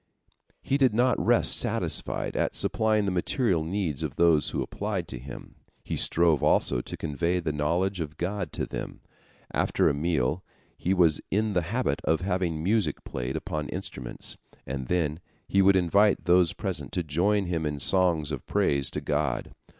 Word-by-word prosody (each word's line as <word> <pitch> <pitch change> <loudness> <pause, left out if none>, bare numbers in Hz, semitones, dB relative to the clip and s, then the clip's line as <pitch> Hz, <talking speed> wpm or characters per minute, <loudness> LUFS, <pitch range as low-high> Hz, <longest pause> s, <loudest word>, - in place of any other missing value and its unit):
He 140 - 0
did 130 -6 +3
not 125 +2 +2
rest - - +4
satisfied - - -1
at - - 0
supplying 110 -1 +1
the 100 - 0
material 90 - +1
needs 80 -4 -2
of 75 -4 -4
those 85 -3 +4
who - - -2
applied 100 -5 -4
to 65 - -6
him. 70 +3 -10 0.3
He - - -4
strove 85 -4 +3
also - - +2
to - - -7
convey 85 +4 -1
the 85 -3 -2
knowledge 85 +6 0
of 80 -2 -5
God 95 -1 -3
to - - -1
them. - - -7 0.5
After - - +2
a - - 0
meal 75 +1 0 0.3
he 90 - -2
was 85 -4 +4
in 105 +1 0
the 90 - +2
habit 115 +9 -1
of 80 +2 +1
having 90 -4 -1
music 100 -5 0
played 60 +2 -4
upon 75 -1 -4
instruments, 60 -2 -7 0.3
and 65 -1 -5
then 80 -2 0 0.3
he 100 - +3
would 95 0 +5
invite 100 +3 +3
those 90 -1 +4
present 85 -9 -4
to 90 - -1
join 95 +7 +1
him 85 -2 -2
in 75 -1 -4
songs 85 -2 +2
of 70 -5 -6
praise 70 -2 +2
to - - -4
God. - - -2
85 Hz, 175 wpm, -27 LUFS, 75-95 Hz, 0.5 s, would